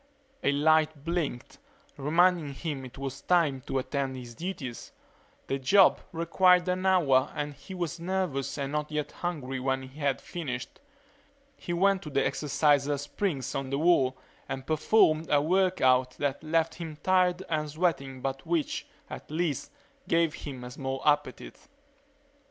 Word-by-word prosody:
A - - +3
light 155 0 +2
blinked, 165 -8 -3 0.4
reminding 160 0 +2
him 145 -3 -4
it 130 0 -11
was 135 0 -5
time 160 -7 +2
to - - -1
attend 135 0 -2
to - - -6
his 120 -1 -10
duties. 150 -6 -6 0.5
The 135 - -2
job 190 +9 +5
required 180 +2 +3
an 185 +1 0
hour 145 -8 +3
and 145 0 -3
he 145 +7 -10
was 175 -1 -3
nervous 175 -7 -2
and 140 -1 -3
not 150 0 -2
yet 150 -1 -2
hungry 140 -7 -4
when 130 0 -1
he 130 +3 -12
had 140 -2 0
finished. 135 -8 -6 0.8
He - - -7
went 190 +2 +3
to 150 - -7
the 135 -1 +1
exerciser 145 -1 +2
springs 145 - -3
on 135 -1 -3
the 140 - -1
wall 140 -5 +3 0.3
and 130 0 -4
performed 155 0 +3
a 145 - +4
work 185 +4 +1
out 130 0 +3
that 145 -1 -2
left 165 +1 +1
him 165 -3 -7
tired 185 -1 +3
and 155 -2 -1
sweating 145 -5 -1
but 135 0 -3
which, 165 -3 -1 0.2
at - - -9
least, 155 -3 -2 0.4
gave 165 -2 +2
him 130 -4 -7
a 125 - -7
small 135 +1 -4
appetite. 145 -3 -1
150 Hz, 155 wpm, -28 LUFS, 135-170 Hz, 0.8 s, job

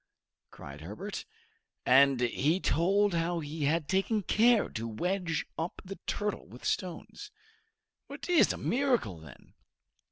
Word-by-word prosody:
cried 70 +2 -11
Herbert. 100 +7 -6 0.6
And 135 0 +5
he 145 +8 +1
told 195 +6 +2
how 170 +1 0
he 150 -1 -3
had 155 +1 +1
taken 195 +4 +1
care 225 +3 +4
to 115 +1 -5
wedge 175 - -1
up 165 +2 -3
the 195 +1 -8
turtle 210 -1 -2
with 120 - -12
stones. 185 - -3 0.8
"It - - -8
is 355 -3 +5
a - - -4
miracle, 245 - 0
then!" 75 -5 -15
165 Hz, 130 wpm, -30 LUFS, 130-200 Hz, 0.8 s, And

